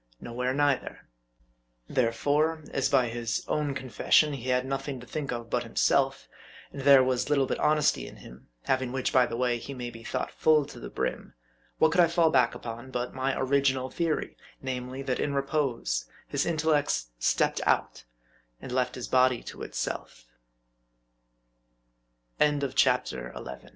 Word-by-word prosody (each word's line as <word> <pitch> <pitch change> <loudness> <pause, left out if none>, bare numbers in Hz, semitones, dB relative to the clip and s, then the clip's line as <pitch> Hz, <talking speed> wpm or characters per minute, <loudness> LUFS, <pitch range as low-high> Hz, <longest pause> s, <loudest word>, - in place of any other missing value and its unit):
Nowhere 125 +2 -3
neither. 145 -2 0 0.9
There 120 -3 +1
fore, 155 +6 +1
as - - 0
by 130 -4 +3
his 115 -1 -3
own 145 -2 -1
confession 135 +3 +2
he 130 -2 -5
had 125 0 +2
nothing 135 0 -3
to 125 - -11
think 145 +2 -4
of 120 -1 -5
but 125 - +1
himself, 135 +3 +1 0.5
and 140 - -6
there 135 -1 +7
was 130 +1 0
little 140 -2 +3
but - - -3
honesty 150 -1 +2
in - - -11
him 60 +1 -14 0.2
(having 130 -1 0
which, 130 0 -1
by 125 -1 +5
the 115 - -4
way, 125 -1 +1
he 140 +4 -7
may 120 -1 -5
be 115 -1 -12
thought - - -3
full 155 -2 +3
to 145 - -11
the - - -7
brim), - - -4 0.4
what 160 - +4
could 180 +1 +5
I 170 - +6
fall 165 -1 +3
back 125 -3 +3
upon 120 +2 -7
but 125 -1 -3
my 130 +1 -1
original 130 -1 +1
theory: 165 -3 -1 0.2
name 125 -1 -4
ly, 130 +1 -6
that 130 -2 -1
in 140 -1 -1
repose, 135 - -1 0.2
his - - -1
intellects 150 - +1
stepped - - +1
out, - - 0 0.6
and 130 - -8
left 125 0 0
his 125 - -5
130 Hz, 150 wpm, -28 LUFS, 125-145 Hz, 0.9 s, there